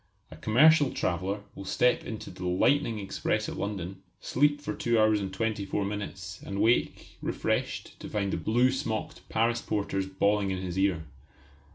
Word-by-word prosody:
A - - -9
commercial 145 - +5
traveller 95 +2 -1
will 100 - -8
step 125 +5 +2
into 110 -4 -6
the 90 0 -5
lightning 115 +6 +2
express 105 +2 -1
at - - -5
London, 95 -2 -4 0.2
sleep 145 +2 +2
for - - -4
two 120 -1 +1
hours 110 -1 +4
and 95 -1 -3
twenty 105 +1 -1
four 100 +1 -1
minutes 95 -3 -5
and 100 0 -4
wake, 115 +3 +1
refreshed, - - -2
to - - -7
find 100 -2 -1
the - - 0
blue 120 +4 +3
smocked 120 -5 -3
Paris 115 +1 +1
porters 95 -2 -1
bawling 100 +1 +1
in 95 - -1
his 90 0 -3
ear. 95 -5 +2
105 Hz, 170 wpm, -29 LUFS, 95-115 Hz, 0.2 s, commercial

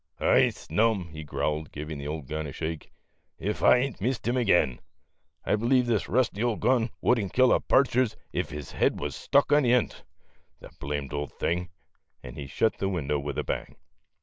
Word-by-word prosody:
"I - - +4
snuni," 95 0 0
he 80 -1 -7
growled, 75 0 -2
giving 75 0 -6
the 70 - -6
old 75 -1 -4
gun 75 +2 -4
a - - -6
shake, 80 +2 -5 0.2
" - - -47
ef 105 +4 -3
I 125 - +6
hain't 130 -7 -4
missed 120 +1 -1
him 120 - +1
again. 85 - +2 0.7
I - - +2
believe 120 +4 +2
this 115 -4 0
rusty 115 -3 +1
ole 120 -2 +1
gun 120 0 +2
would 125 - +3
n't 100 - -4
kill 130 0 +5
a - - +3
partridge 130 -3 +2 0.2
ef - - -1
his 75 0 -7
head - - +1
wuz 75 0 -3
stuck 140 +1 +2
in 145 +1 +6
the 125 -3 +3
end 125 -3 +2
on - - -13
't, - - -22 0.6
the - - -11
blamed 70 -1 -4
old 75 0 -4
thing," 90 +1 -2 0.5
and 60 - -9
he 70 - -7
shut 110 +10 0
the 95 - 0
window 75 -6 -1
with 70 0 -5
a - - 0
bang. - - -4
95 Hz, 210 wpm, -27 LUFS, 75-120 Hz, 0.7 s, I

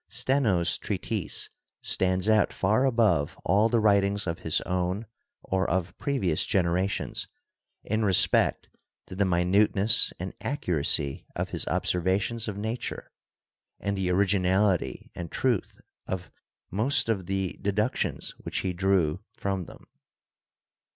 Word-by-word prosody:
Steno's 110 - +1
treatise - - -2 0.3
stands 95 +1 +1
out 110 -2 +4
far 110 +7 +1
above 110 - +2
all 105 +5 +3
the 115 - +2
writings 100 -1 +3
of 85 0 -3
his 80 -2 +2
own 90 +4 -2 0.4
or 95 0 0
of 85 0 -1
previous 100 - +1
generations 90 +1 0 0.6
in 110 +1 -1
respect 95 -3 +3 0.4
to - - -9
the 100 +1 +2
minuteness 95 +4 +3
and 95 +1 -5
accuracy 80 - -1
of - - -2
his - - -2
observations 95 +6 0
of 105 -2 -4
Nature 110 +4 -4 0.7
and 100 0 -2
the 95 -2 -1
originality 95 -4 +1
and 85 -2 -7
truth 125 -7 -1 0.3
of 90 -1 -5 0.4
most 120 - +2
of 100 -6 -1
the 95 -1 -2
deductions 105 +4 -1
which - - -4
he 95 -1 -2
drew 90 -4 +1 0.2
from 95 -2 -2
them. - - -14
95 Hz, 125 wpm, -27 LUFS, 90-105 Hz, 0.7 s, out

